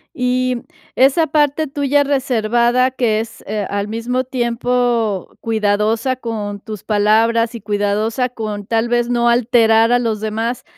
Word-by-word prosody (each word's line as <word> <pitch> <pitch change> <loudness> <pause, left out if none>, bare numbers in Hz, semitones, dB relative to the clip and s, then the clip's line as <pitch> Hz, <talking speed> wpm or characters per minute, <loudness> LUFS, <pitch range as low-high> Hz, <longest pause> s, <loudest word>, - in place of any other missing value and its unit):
Y 255 0 0 0.4
esa 275 +5 +3
parte 300 0 +1
tuya 285 +1 +1
reservada 250 -2 +1
que 235 -4 0
es, 225 0 -8
eh, 210 0 -2
al 200 0 -2
mismo 235 +4 -2
tiempo 240 -4 -1
cuidadosa 220 +3 0
con 215 -4 -5
tus 215 -2 -8
palabras 225 +2 +2
y 235 - -6
cuidadosa 210 +4 -1
con 215 -4 -6
tal 225 +2 0
vez 240 0 +1
no 240 -1 +1
alterar 230 -1 +3
a 245 - +4
los 225 -3 -2
demás, 225 +3 -3
230 Hz, 140 wpm, -18 LUFS, 215-250 Hz, 0.4 s, a